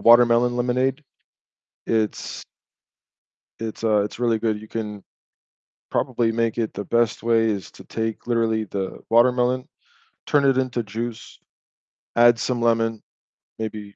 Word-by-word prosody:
watermelon 120 +1 +5
lemonade. 130 +3 0 0.8
It's 110 -2 -1 1.2
it's, 115 0 -6
uh 105 -2 +3
it's 105 - -6
really 115 -2 +1
good. 110 -2 0
You 110 - -12
can 105 -3 -5 0.9
probably 120 -3 0
make 115 0 0
it 115 - -1
the 100 - -4
best 115 +2 +1
way 115 -1 +3
is 100 -3 -4
to - - -14
take 110 0 -4
literally 115 -2 +1
the 95 -2 -4
watermelon, 125 +2 +3 0.6
turn 145 -1 +3
it 135 -1 +4
into 125 -2 0
juice, 115 +2 -6 0.8
add 120 0 +6
some 120 0 -1
lemon, 115 -1 +1 0.6
maybe 105 -2 -6
115 Hz, 130 wpm, -23 LUFS, 110-120 Hz, 1.2 s, add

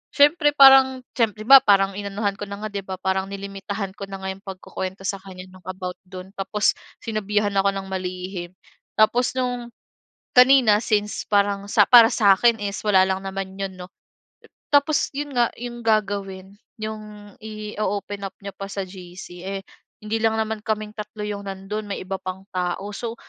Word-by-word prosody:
siyempre 295 +1 +5
parang 265 -1 +7 0.2
siyem 225 -3 +2
'di 215 - -10
ba 275 +1 +11
parang 195 -1 +3
inanuhan 200 0 -2
ko 205 - -4
na 200 0 -7
nga, 215 - -1
'di 200 - -3
ba? 190 - -5
Parang 190 0 -1
nilimitahan 195 0 -5
ko 200 - -8
na 195 0 -7
nga 190 - -5
'yong 195 +1 -11
pagkukuwento 190 0 -6
sa 195 - -2
kanya 185 -1 -11
no'ng 185 -1 -17
about 185 -1 -5
do'n, 185 0 -10
tapos 205 +2 +1 0.3
sinabihan 210 -2 -1
ako 195 0 +3
ng 195 0 -5
malihim. 185 -1 -5 0.5
Tapos 240 +3 +4
no'ng, 245 -1 -2 0.7
kanina 250 -4 +7
since 210 -1 -1
parang 200 -1 +2
sa 215 -1 +5
para 235 -2 +9
sa'kin 225 +2 +4
is 200 0 -3
wala 200 -3 +5
lang 190 0 -1
naman 190 0 -5
'yon 195 -1 -3
'no. 180 0 -8 0.9
Tapos 285 +1 +3
'yon 290 +1 -4
nga, 240 -1 +3
'yong 240 0 -7
gagawin, 200 -3 -1 0.3
'yong 210 -2 -8
i-o-open 210 -2 -4
up 190 - -11
niya 200 - -6
pa 195 - -6
sa 195 - -3
GC, 180 -1 -11
eh, 195 0 -3 0.4
hindi 215 +1 -1
lang 220 0 +2
naman 220 -1 -2
kaming 215 -1 -3
tatlo 210 0 -7
'yong 200 -1 -5
nando'n, 195 +2 -5
may - - -3
iba 195 +1 -4
pang 185 +1 -6
tao. 180 +3 -2
So, 230 +1 -5
200 Hz, 175 wpm, -23 LUFS, 190-220 Hz, 0.9 s, ba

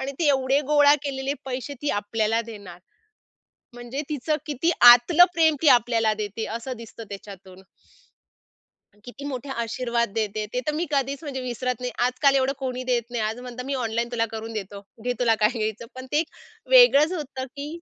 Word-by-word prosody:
आणि 275 +1 -4
ते 330 - +1
एवढे 270 0 +2
गोळा 290 -1 +6
केलेले 275 -1 -3
पैसे, 265 +2 -5
ती 290 - 0
आपल्याला 220 +2 0
देणार. 200 -5 -11 1.0
म्हणजे 245 +3 -6
तिचं 300 +1 -1
किती 300 +3 0
आतलं 245 +9 +8
प्रेम 320 -2 +4
ती 305 - +5
आपल्याला 230 -3 +3
देते 210 +2 -4
असं 250 +1 -6
दिसतं 230 0 -10
त्याच्यातून. 195 -2 -11 1.4
किती 260 +3 -10
मोठे 275 -1 -5
आशीर्वाद 235 0 -1
देते. 215 -1 -2
ते 250 - -1
तर 300 - 0
मी 335 +3 -2
कधीच 275 +1 -1
म्हणजे 275 -4 -5
विसरत 250 0 -3
नाही. 250 0 -3 0.2
आजकाल 275 +2 +2
एवढं 265 0 +1
कोणी 255 -1 -4
देत 245 -2 +1
नाही. 240 -2 -2
आज 220 +2 -3
म्हणतात 250 0 -8
मी 275 - -2
ऑनलाईन 235 -2 -2
तुला 230 -1 0
करून 225 0 -6
देतो. 200 -2 -6 0.2
घे 245 - 0
तुला 235 -2 +3
काय 210 - +5
घ्यायचं. 220 +1 -3
पण 260 0 -9
ते 295 - +3
एक 315 0 -1 0.4
वेगळंच 370 - +7
होतं 280 -6 -5
की 285 +1 -5
250 Hz, 180 wpm, -24 LUFS, 225-280 Hz, 1.4 s, आतलं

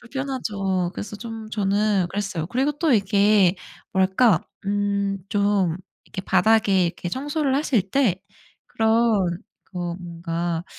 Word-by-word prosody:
불편하죠. 210 -9 -2
그래서 205 0 -6
좀 225 0 -8
저는 200 -2 +1
그랬어요. 195 -5 -3
그리고 265 +4 0
또 295 0 +1
이게 200 -2 +4 0.4
뭐랄까? 190 +1 +3 0.3
음 200 -1 0
좀 200 -5 +1 0.3
이렇게 190 - -7
바닥에 200 -6 +3 0.2
청소를 285 - -1
하실 235 - 0
때 220 -10 +2 0.5
그런 220 -6 +2 0.3
그 185 - -9
어 175 -1 -3
뭔가 170 -1 -4
200 Hz, 240 characters per minute, -23 LUFS, 185-225 Hz, 0.5 s, 이게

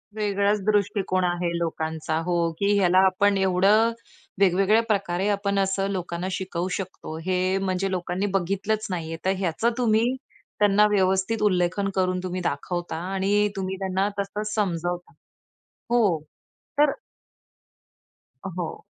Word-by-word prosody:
वेगळाच 205 -1 +1
दृष्टिकोन 200 -3 +1
आहे 175 -1 0
लोकांचा 160 -1 -2
हो, 175 - +1 0.2
की 200 0 +2
ह्याला 185 -2 +3
आपण 200 +2 +3
एवढं 195 +4 +4 0.5
वेगवेगळ्या 195 +4 +4
प्रकारे 195 -2 0
आपण 200 -1 0
असं 195 0 0
लोकांना 180 -1 -3
शिकवू 185 -1 -3
शकतो, 180 -4 -7
हे 185 +1 +1
म्हणजे 195 0 -1
लोकांनी 180 +1 -2
बघितलंच 200 +4 -1
नाहीये. 165 -3 -4
तर 190 - +3
ह्याचं 190 +5 0
तुम्ही 225 -2 +3 0.5
त्यांना 210 0 +5
व्यवस्थित 190 +3 +1
उल्लेखन 185 0 +1
करून 185 -1 +1
तुम्ही 185 0 -3
दाखवता 175 +2 -3 0.2
आणि 205 +2 +2
तुम्ही 190 0 -3
त्यांना 190 0 0
तसंच 210 +2 -3
समजवता 175 -3 -2 0.8
हो, 215 -9 +3 0.6
तर 295 -1 +5 1.6
हो. 175 -3 -5
190 Hz, 120 wpm, -25 LUFS, 180-205 Hz, 1.6 s, त्यांना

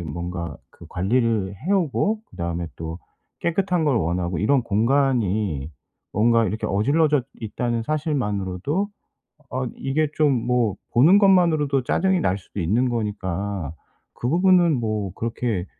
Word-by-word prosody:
뭔가 85 0 -5
그 - - -15
관리를 105 0 0
해 165 - -2
오고 200 +4 +1
그다음에 85 0 -4
또 80 +1 -6 0.4
깨끗한 180 0 0
걸 145 -5 +2
원하고 90 -2 -1
이런 130 +5 +2
공간이 110 - +1 0.4
뭔가 115 +2 +3
이렇게 110 +1 -2
어질러졌 140 +6 +2
있다는 115 +1 -2
사실만으로도 140 - -1 0.6
어 130 0 -2
이게 145 +3 0
좀 140 -6 +2
뭐 120 -5 +1 0.2
보는 160 +12 +6
것만으로도 165 -9 +3
짜증이 190 +6 +1
날 95 - 0
수도 100 +1 -8
있는 110 +10 +1
거니까 100 - -3 0.4
그 120 - -3
부분은 175 +1 +4
뭐 105 -4 -2
그렇게 115 -5 -2
115 Hz, 285 characters per minute, -23 LUFS, 95-150 Hz, 0.6 s, 보는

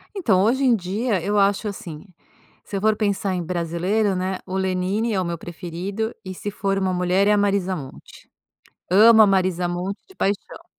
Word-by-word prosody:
Então, 220 - +2
hoje 260 +5 +2
em 245 -3 +4
dia 200 +1 -2
eu 205 +1 +1
acho 200 +2 +2
assim, 165 -6 -8 0.6
se 200 - -6
eu - - -2
for 215 +1 +2
pensar 200 -2 -1
em 180 - -2
brasileiro, 180 +5 -1
né, 185 0 -2
o 185 - -6
Lenini 190 +4 -1
é 190 - +1
o - - -1
meu 170 -1 -3
preferido, 180 +7 -5
e 185 0 -6
,se 205 - -5
for 195 -1 -1
uma 190 -1 0
mulher, 180 +2 +1
é - - +5
a 210 - +4
Marisa 200 -2 +1
Monte. 135 -5 -11 0.6
Amo 220 +3 +7
a 210 - +7
Marisa 185 -2 +1
Monte 180 +3 -3
de 380 - -19
paixão. 200 - -3
195 Hz, 195 wpm, -22 LUFS, 180-210 Hz, 0.6 s, Amo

